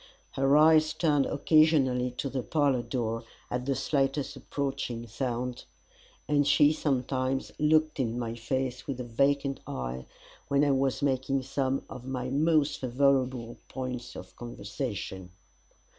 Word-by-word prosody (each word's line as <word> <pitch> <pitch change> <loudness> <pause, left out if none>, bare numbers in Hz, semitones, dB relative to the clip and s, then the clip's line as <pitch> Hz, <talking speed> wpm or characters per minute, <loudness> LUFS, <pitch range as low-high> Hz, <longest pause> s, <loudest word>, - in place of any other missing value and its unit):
Her 135 +2 +3
eyes 155 0 +5
turned 155 -3 +2
occasionally 145 -5 +3
to - - -2
the 135 -1 -2
parlour 140 -2 +1
door 115 -1 -2 0.3
at 125 +1 -2
the 135 - +1
slightest 135 +1 0
approaching 135 -4 -3
sound, 125 +1 -3 0.6
and 145 -1 +2
she 150 0 +5
sometimes 135 -2 -1
looked 155 0 +3
in 120 -2 -1
my 115 -2 -3
face 125 +2 -3
with 135 -3 -3
a - - -2
vacant 140 +3 +1
eye, 65 0 -5 0.4
when 140 +1 +3
I 145 - +3
was 135 0 +1
making 135 0 0
some 135 0 -1
of 125 - -9
my 130 -1 -4
most 150 0 +2
favourable 130 -2 +1
points 125 -2 -5
of - - -10
conversation. 100 -5 -6
135 Hz, 135 wpm, -29 LUFS, 125-145 Hz, 0.6 s, eyes